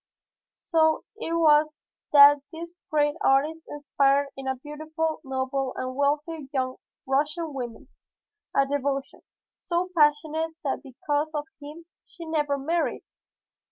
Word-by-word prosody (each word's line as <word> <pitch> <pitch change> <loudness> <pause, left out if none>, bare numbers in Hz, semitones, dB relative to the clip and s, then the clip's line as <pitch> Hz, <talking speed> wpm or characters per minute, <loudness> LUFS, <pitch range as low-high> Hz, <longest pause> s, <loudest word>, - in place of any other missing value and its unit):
"So 315 -2 +2
it 330 - -4
was 305 -2 +4 0.3
that 285 0 +9
this 340 +2 -9
great 295 -1 +2
artist 305 +4 +2
inspired 280 -1 +1
in 270 0 -7
a 265 - 0
beautiful, 310 +3 -4
noble 265 0 -2
and 255 0 -4
wealthy 290 +1 -1
young 260 -2 -2 0.3
Russian 300 +4 -1
woman, 240 -4 -6 0.7
a 275 - +4
devotion 275 0 -2 0.4
so 360 +1 -2
passionate 315 +1 +2
that 280 - -2
because 290 +3 -3
of 295 0 -2 0.2
him 300 +3 -10 0.2
she 340 - -11
never 295 -3 0
married. 325 +5 -1
295 Hz, 125 wpm, -26 LUFS, 275-320 Hz, 0.7 s, that